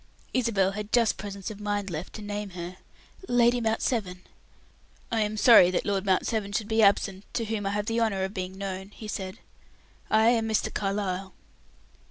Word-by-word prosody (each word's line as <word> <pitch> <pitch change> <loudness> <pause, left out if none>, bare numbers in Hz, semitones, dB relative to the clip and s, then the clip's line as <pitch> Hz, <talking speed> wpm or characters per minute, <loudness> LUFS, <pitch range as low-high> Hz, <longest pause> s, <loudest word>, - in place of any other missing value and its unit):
Isabel 215 -7 +2
had 210 +1 -6
just 235 -3 +3
presence 200 0 -6
of 210 - -9
mind 205 -2 -2
left 160 +3 -5
to 215 - -8
name 205 0 -4
her: 175 +1 -6 0.5
"Lady 245 0 +3
Mount 225 0 0
Severn." 185 -7 -1 0.9
"I 225 -1 +1
am 210 0 -1
sorry 210 -5 +8
that 185 - -1
Lord 200 -1 -1
Mount 190 -1 +2
Severn 205 -3 -2
should 210 0 -1
be 220 0 +2
absent, 200 -1 +3
to 230 - 0
whom 210 -2 -2
I - - +1
have 205 +1 -1
the 225 +1 0
honor 205 -4 +1
of 190 +1 -3
being 185 -1 -5
known," 195 0 -5
he 215 +1 -10
said. 190 -2 -5 0.7
"I 220 +1 +5
am 225 -2 +1
Mr. 220 - 0
Carlyle." 195 -2 -2
205 Hz, 190 wpm, -27 LUFS, 190-220 Hz, 0.9 s, sorry